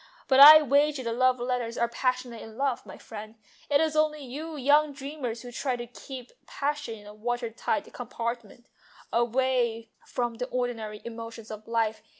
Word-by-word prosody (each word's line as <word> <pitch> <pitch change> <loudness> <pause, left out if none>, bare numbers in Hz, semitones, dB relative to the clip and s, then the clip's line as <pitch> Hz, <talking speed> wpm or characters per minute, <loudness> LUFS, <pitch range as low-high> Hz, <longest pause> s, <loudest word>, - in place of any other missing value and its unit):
But 265 -1 +4
I 305 +2 +12
wager 285 0 +2
the 230 -1 -2
love 255 +1 +3
letters 240 -1 -2
are 235 - +2
passionate 250 -1 -2
enough, 245 +3 -3
my - - -10
friend. 215 0 -9 0.3
It 285 -1 +4
is 315 0 +1
only 305 -2 +1
you 305 +5 -6
young 290 +2 +3
dreamers 270 -4 -5
who 245 - -8
try 255 +1 -2
to 240 0 -6
keep 250 +1 -10 0.2
passion 290 -5 -3
in 205 - -15
a 210 - -10
water 240 +2 -3
tight 295 +6 -2
compartment, 235 -1 -5 0.5
away 235 -1 +1 0.2
from 240 -2 -2
the 250 +1 -3
ordinary 230 -5 -3
emotions 230 -1 -8
of 215 0 -9
life. 225 -1 0
245 Hz, 165 wpm, -27 LUFS, 230-275 Hz, 0.5 s, I